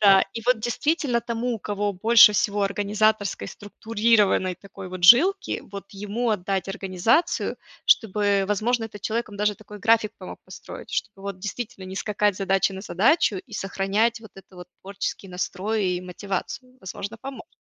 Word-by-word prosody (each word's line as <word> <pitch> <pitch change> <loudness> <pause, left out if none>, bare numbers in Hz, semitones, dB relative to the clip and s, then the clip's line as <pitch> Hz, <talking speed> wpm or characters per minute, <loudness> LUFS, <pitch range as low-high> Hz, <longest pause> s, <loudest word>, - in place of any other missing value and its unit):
Да, 195 -2 +6
и 230 - -5
вот, 250 -1 +3
действительно, 245 +2 0
тому, 235 +1 -2
у - - -5
кого 205 0 -2
больше 220 +3 +7
всего 205 0 +1
организаторской, 205 - 0
структурированной 205 - +1
такой 195 -1 -11
вот 180 -1 -4
жилки, 355 - +5
вот 200 0 -7
ему 210 +4 -2
отдать 195 -1 -1
организацию, 195 - 0 0.3
чтобы, 205 -2 +3
возможно, 225 +3 0
этот 205 -2 -9
человек 230 +1 -2
вам 205 - -10
даже 210 +1 +1
такой 210 0 -12
график 225 0 +3
помог - - -9
построить, - - -10
чтобы 195 -1 -4
вот 200 -2 -5
действительно 210 +1 -6
не 185 - -8
скакать 205 0 0
с - - -11
задачи 195 0 +1
на 190 - -7
задачу 205 - +2
и - - -10
сохранять 200 +4 0
вот 220 -4 -14
это 190 -1 -16
вот 180 - -10
творческий 195 0 -5
настрой 190 +4 -2
и 180 -1 0
мотивацию. 200 +7 -5
Возможно, 195 +3 -6
поможет. 270 +3 -10
205 Hz, 165 wpm, -24 LUFS, 195-225 Hz, 0.3 s, больше